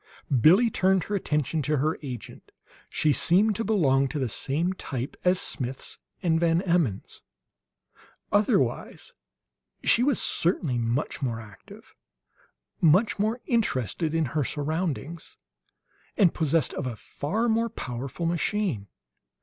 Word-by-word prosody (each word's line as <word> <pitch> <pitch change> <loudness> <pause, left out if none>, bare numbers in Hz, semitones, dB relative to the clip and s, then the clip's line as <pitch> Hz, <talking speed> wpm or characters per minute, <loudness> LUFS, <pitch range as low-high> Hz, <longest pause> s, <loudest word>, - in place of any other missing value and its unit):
] 130 -4 0
Billie 200 - +6
turned 190 -2 +2
her 205 - -3
attention 150 -4 -1
to 150 +2 0
her 155 +4 0
agent. 125 -6 -8 0.4
She 150 -2 +2
seemed 205 +8 +4
to 225 - -1
belong 140 -11 +2
to 150 - -5
the 130 -3 0
same 160 - -1
type 135 -7 -5
as 180 0 +3
Smith's 130 0 -4 0.2
and 165 -2 +2
Van 170 +1 +2
Emmon's; 170 - 0 1.1
otherwise 205 0 0 0.7
she 235 - +4
was 275 -1 +2
certainly 160 -7 +1
much 120 +6 -2
more 120 -4 -2
active, 105 -3 -14 0.9
much 185 +7 +4
more 220 +4 0
interested 160 - 0
in 165 -1 +2
her 150 -1 +1
surroundings, 160 +3 -3 0.8
and 190 -6 +4
possessed 160 -2 +1
of 130 - -3
a 120 - -4
far 200 - -2
more 230 0 +1
powerful 135 - -5
machine. 170 - -1
160 Hz, 130 wpm, -26 LUFS, 135-190 Hz, 1.1 s, Billie